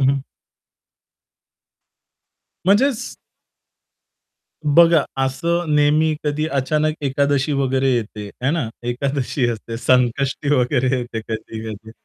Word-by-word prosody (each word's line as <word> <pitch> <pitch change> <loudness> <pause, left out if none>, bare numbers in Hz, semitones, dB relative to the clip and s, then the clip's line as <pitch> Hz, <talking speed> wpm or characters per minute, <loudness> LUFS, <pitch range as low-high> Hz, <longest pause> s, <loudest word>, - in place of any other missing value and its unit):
हं, 135 - +4
हं. 140 0 0 2.5
म्हणजेच 235 +4 +2 1.6
बघा 170 -2 +6 0.2
असं 170 +4 -1
नेहमी 150 +2 +3
कधी 150 +1 0
अचानक 150 +2 0
एकादशी 140 +1 +1
वगैरे 135 -1 +1
येते, 105 -3 -4 0.2
है 135 - +2
ना. 155 -7 -1 0.2
एकादशी 130 +1 -1
असते, 115 0 -5
संकष्टी 130 +3 +1
वगैरे 130 0 +1
येते, 120 -2 -4
कधी-कधी, 110 -1 -7
135 Hz, 95 wpm, -20 LUFS, 120-155 Hz, 2.5 s, बघा